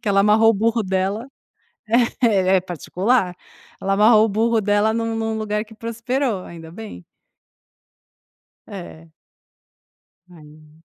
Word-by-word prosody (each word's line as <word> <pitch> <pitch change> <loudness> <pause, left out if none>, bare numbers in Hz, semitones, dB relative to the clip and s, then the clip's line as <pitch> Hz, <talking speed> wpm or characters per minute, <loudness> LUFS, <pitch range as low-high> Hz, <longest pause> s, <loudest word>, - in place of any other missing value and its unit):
que 230 - -4
ela 195 0 +3
amarrou 215 +2 +5
o - - +1
burro 225 +3 +1
dela 195 +4 -2 1.0
É, 190 -4 +3
é - - 0
particular. 180 - -1 0.5
Ela 195 0 0
amarrou 215 +2 +5
o - - -2
burro 225 +3 +1
dela 205 +2 +2
num 230 0 -2
num 225 0 -2
lugar 210 -1 -2
que 220 - -15
prosperou, 230 -1 -2
ainda 165 -1 -11
bem. 175 - -10 1.7
É. 80 -1 -10 1.2
Ai 155 -1 -17
210 Hz, 125 wpm, -21 LUFS, 185-225 Hz, 1.7 s, amarrou